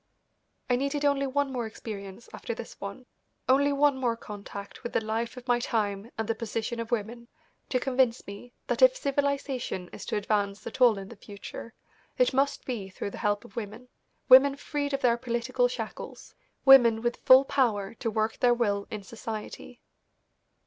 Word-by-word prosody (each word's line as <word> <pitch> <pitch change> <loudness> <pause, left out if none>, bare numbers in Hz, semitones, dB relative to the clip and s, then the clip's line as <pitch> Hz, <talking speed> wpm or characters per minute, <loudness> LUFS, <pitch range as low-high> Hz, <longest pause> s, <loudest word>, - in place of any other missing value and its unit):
I 245 - +2
needed 280 +2 -1
only 280 -1 +2
one 280 +1 0
more 245 -3 -2
experience 205 -1 -8
after 230 - -5
this 230 - -10
one, 200 +6 -7 0.4
only 280 +2 +4
one 285 0 +3
more 240 -3 0
contact 200 -2 -9
with 240 - -6
the - - +3
life 230 +3 -2
of 250 0 -10
my 245 -1 +3
time 210 -3 -2
and 225 -1 -2
the 225 - +1
position 225 +1 -4
of 230 -1 -4
women, 235 +1 -3 0.4
to 255 - +1
convince 255 -2 +1
me 200 +5 -10
that - - -2
if - - +7
civilisation 275 - -2
is - - -8
to - - -2
advance 205 -1 -1
at 260 - -7
all 235 -4 +6
in 195 0 -7
the 235 - -10
future, 205 +3 -10 0.4
it - - +3
must 280 +2 +1
be 220 -7 -4
through 195 +1 -5
the - - -8
help 205 0 0
of 200 - -16
women, 230 +3 -7 0.4
women 275 +2 +8
freed 290 0 -3
of 275 0 -1
their 240 -3 +3
political 245 +1 0
shackles, 245 -3 -7 0.3
women 240 -4 +7
with 240 0 0
full 260 +1 +8
power 220 -8 0
to 230 - -1
work 220 0 -1
their 245 -1 +4
will 205 -4 0
in 210 -2 -6
society. 225 +3 -8
235 Hz, 180 wpm, -28 LUFS, 215-260 Hz, 0.4 s, women